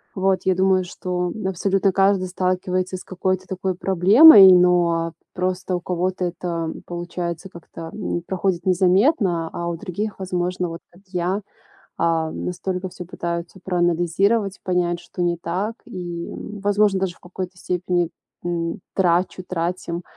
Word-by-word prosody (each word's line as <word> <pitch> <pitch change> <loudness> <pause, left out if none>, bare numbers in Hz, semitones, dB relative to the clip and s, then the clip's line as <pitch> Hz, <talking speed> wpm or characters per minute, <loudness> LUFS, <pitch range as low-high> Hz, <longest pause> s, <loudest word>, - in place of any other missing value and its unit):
Вот, 190 -1 +2
я 185 - +3
думаю, 185 0 +3
что 180 0 -3 0.2
абсолютно 195 +1 +1
каждый 195 -1 +3
сталкивается 185 0 -1
с - - -11
какой-то 185 0 -2
такой 185 0 -2
проблемой, 195 - +8
но 175 -2 +3 0.2
просто 185 0 -2
у - - -8
кого-то 180 +1 -1
это 170 -2 -3
получается 175 0 -5
как-то, 165 -2 -10
м, 180 -4 -3
проходит 185 -2 -1
незаметно, 185 - +3
а 170 0 -3
у 170 - -3
других, 205 +3 -4
возможно, 180 -1 -2
вот 165 0 -7
как 175 +3 -21
я, 185 +2 -1 0.6
а, 165 -1 +1
настолько 185 +1 -3
всё 180 0 -9
пытаются 170 +1 -5
проанализировать, 180 +4 +1
понять, 175 -1 0
что 175 +1 -6
не 175 0 +1
так. 185 +7 -3
И, 175 -2 -6 0.3
возможно, 205 -1 +2
даже 185 -3 -2
в - - -26
какой-то 180 0 -7
степени, 180 -1 -1 0.4
м, 170 +1 -2 0.2
трачу 180 0 +1
тратим 175 0 -3
180 Hz, 135 wpm, -22 LUFS, 175-190 Hz, 0.6 s, проблемой